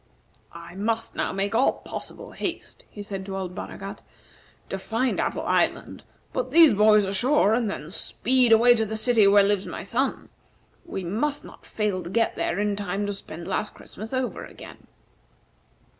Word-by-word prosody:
"I 170 Hz, +1 st, -10 dB
must 225 Hz, +4 st, -2 dB
now -, -, -1 dB
make 195 Hz, +2 st, -2 dB
all 245 Hz, +4 st, +4 dB
possible -, -, -8 dB
haste," -, -, -4 dB
he 205 Hz, -, -8 dB
said 195 Hz, -2 st, -5 dB
to 195 Hz, 0 st, -4 dB
old 185 Hz, -2 st, -4 dB
Baragat, -, -, -7 dB, 0.7 s
"to 195 Hz, -, -3 dB
find 230 Hz, +6 st, -1 dB
Apple -, -, -1 dB
Island, -, -, 0 dB, 0.3 s
put -, -, -2 dB
these 330 Hz, -5 st, +7 dB
boys 210 Hz, 0 st, +5 dB
ashore, 215 Hz, +3 st, +3 dB
and 230 Hz, -2 st, +1 dB
then 155 Hz, -5 st, -6 dB
speed 250 Hz, +4 st, +2 dB
away 235 Hz, +2 st, +7 dB
to 225 Hz, -2 st, 0 dB
the 220 Hz, +1 st, -3 dB
city 220 Hz, -2 st, +4 dB
where 200 Hz, 0 st, +6 dB
lives 200 Hz, -1 st, +1 dB
my -, -, -6 dB
son. 255 Hz, +7 st, -2 dB, 0.6 s
We 190 Hz, -, -4 dB
must 255 Hz, +12 st, -2 dB
not -, -, -14 dB
fail 210 Hz, -4 st, -1 dB
to 175 Hz, -, -7 dB
get 230 Hz, +4 st, +1 dB
there 170 Hz, -, -1 dB
in 205 Hz, 0 st, 0 dB
time 200 Hz, 0 st, -2 dB
to 205 Hz, -, -2 dB
spend 170 Hz, -3 st, -9 dB
last 210 Hz, -, -2 dB
Christmas 220 Hz, +2 st, -9 dB
over 260 Hz, -1 st, -2 dB
again." -, -, -12 dB
210 Hz, 175 wpm, -25 LUFS, 195-235 Hz, 0.7 s, these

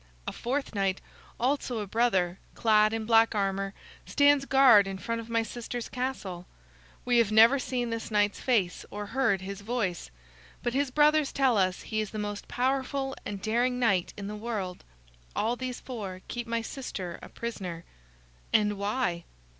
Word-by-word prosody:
A -, -, -1 dB
fourth 270 Hz, +2 st, -3 dB
knight, 195 Hz, -2 st, 0 dB, 0.4 s
also 255 Hz, -1 st, 0 dB
a 210 Hz, -, -2 dB
brother, 195 Hz, -5 st, +1 dB, 0.2 s
clad 215 Hz, -1 st, +4 dB
in 225 Hz, -1 st, -2 dB
black 225 Hz, 0 st, +4 dB
armor, 195 Hz, 0 st, -1 dB, 0.3 s
stands 285 Hz, -1 st, +4 dB
guard 255 Hz, -8 st, +6 dB
in 195 Hz, 0 st, -4 dB
front 230 Hz, +4 st, -3 dB
of 230 Hz, -, -12 dB
my 230 Hz, 0 st, +1 dB
sister's 240 Hz, +1 st, -5 dB
castle. 210 Hz, -9 st, -4 dB, 0.6 s
We 245 Hz, -1 st, +4 dB
have 220 Hz, -3 st, +3 dB
never 230 Hz, +5 st, +7 dB
seen 245 Hz, -2 st, -2 dB
this 230 Hz, 0 st, -4 dB
knight's 205 Hz, -1 st, +1 dB
face 205 Hz, -9 st, +1 dB
or 205 Hz, 0 st, -5 dB
heard 225 Hz, -4 st, +1 dB
his 200 Hz, +1 st, -6 dB
voice, 200 Hz, -, -2 dB, 0.5 s
but 240 Hz, -, -1 dB
his 280 Hz, +1 st, +1 dB
brothers 300 Hz, +2 st, +4 dB
tell 265 Hz, -3 st, +3 dB
us 185 Hz, -2 st, +1 dB
he 215 Hz, -1 st, -2 dB
is 215 Hz, -, -4 dB
the 215 Hz, -, -7 dB
most 205 Hz, -1 st, -4 dB
powerful 270 Hz, +1 st, -1 dB
and 200 Hz, -1 st, -6 dB
daring 240 Hz, +3 st, +1 dB
knight 200 Hz, -8 st, +2 dB
in 200 Hz, -, -6 dB
the 210 Hz, +1 st, -5 dB
world. 210 Hz, -5 st, -4 dB, 0.5 s
All 225 Hz, +3 st, +1 dB
these 255 Hz, 0 st, -5 dB
four 200 Hz, -7 st, -6 dB
keep 240 Hz, -1 st, -5 dB
my 230 Hz, 0 st, -1 dB
sister 195 Hz, -9 st, -6 dB
a -, -, -10 dB
prisoner." 185 Hz, -8 st, -5 dB, 0.7 s
"And 210 Hz, -2 st, +2 dB
why?" 200 Hz, -5 st, -1 dB
225 Hz, 170 wpm, -28 LUFS, 200-250 Hz, 0.7 s, never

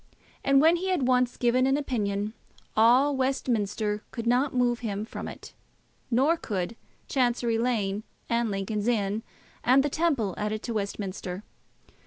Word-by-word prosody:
And 275 Hz, 0 st, +5 dB
when 325 Hz, +4 st, +5 dB
he 375 Hz, +2 st, -2 dB
had 330 Hz, -9 st, +1 dB
once 250 Hz, -1 st, +2 dB
given 250 Hz, +2 st, +3 dB
an 270 Hz, +1 st, +3 dB
opinion, 210 Hz, -7 st, -2 dB, 0.4 s
all 250 Hz, +6 st, +5 dB
Westminster 220 Hz, -5 st, 0 dB
could 230 Hz, -2 st, -6 dB
not 250 Hz, +4 st, +2 dB
move 245 Hz, -1 st, +1 dB
him 210 Hz, -3 st, -3 dB
from -, -, -6 dB
it, -, -, -10 dB, 0.6 s
nor 270 Hz, +8 st, +3 dB
could 200 Hz, -, -3 dB, 0.3 s
Chancery 240 Hz, -3 st, +1 dB
Lane 215 Hz, -4 st, 0 dB, 0.3 s
and 235 Hz, -1 st, +1 dB
Lincoln's 205 Hz, +2 st, -2 dB
Inn 210 Hz, -2 st, +1 dB, 0.4 s
and 260 Hz, +3 st, +5 dB
the 290 Hz, -, 0 dB
Temple 275 Hz, -, +1 dB
added 210 Hz, +1 st, -2 dB
to 235 Hz, -, -3 dB
Westminster. 200 Hz, -2 st, -4 dB
235 Hz, 145 wpm, -27 LUFS, 210-260 Hz, 0.6 s, And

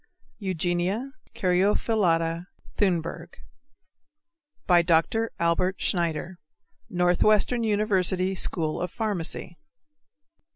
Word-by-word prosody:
(Eugenia 185 Hz, -, -1 dB, 0.2 s
caryophyllata 180 Hz, -3 st, +1 dB, 0.3 s
Thunberg.) 175 Hz, -5 st, -1 dB, 1.3 s
DR. 175 Hz, +5 st, +3 dB
ALBERT 170 Hz, +3 st, +1 dB
SCHNEIDER, 175 Hz, 0 st, -1 dB, 0.5 s
Northwestern 200 Hz, +5 st, +2 dB
University 195 Hz, -3 st, +1 dB
School 165 Hz, -4 st, -1 dB
of 180 Hz, -, -2 dB
Pharmacy. 180 Hz, -6 st, -3 dB
180 Hz, 65 wpm, -26 LUFS, 170-205 Hz, 1.3 s, DR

